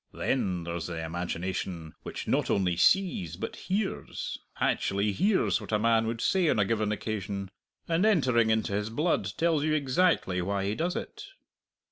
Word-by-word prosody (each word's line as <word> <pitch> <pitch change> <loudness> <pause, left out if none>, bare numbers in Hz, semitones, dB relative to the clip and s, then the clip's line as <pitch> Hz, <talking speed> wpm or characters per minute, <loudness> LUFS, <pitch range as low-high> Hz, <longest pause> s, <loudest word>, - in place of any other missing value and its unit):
Then 95 -9 -1
there's 85 -1 -4
the 80 -2 -4
imagination 85 0 -4
which - - -6
not - - +1
only 90 -3 +2
sees 95 - +2
but 90 - -5
hears 195 +1 -3 0.2
actually 100 +2 +1
hears 190 - +2
what - - -8
a 105 - +3
man 115 +1 +3
would 115 0 -3
say 185 -4 +2
on - - +2
a 105 - +3
given 110 0 0
occasion, 100 -2 -4 0.4
and 170 +2 +2
entering 130 - +3
into 110 -2 +1
his 105 +2 -1
blood, 115 - 0
tells 165 -3 +2
you 155 0 +2
exactly 140 - +2
why 100 +2 -1
he 100 - 0
does 170 +9 -1
it. 420 -1 -6
110 Hz, 165 wpm, -29 LUFS, 95-155 Hz, 0.4 s, a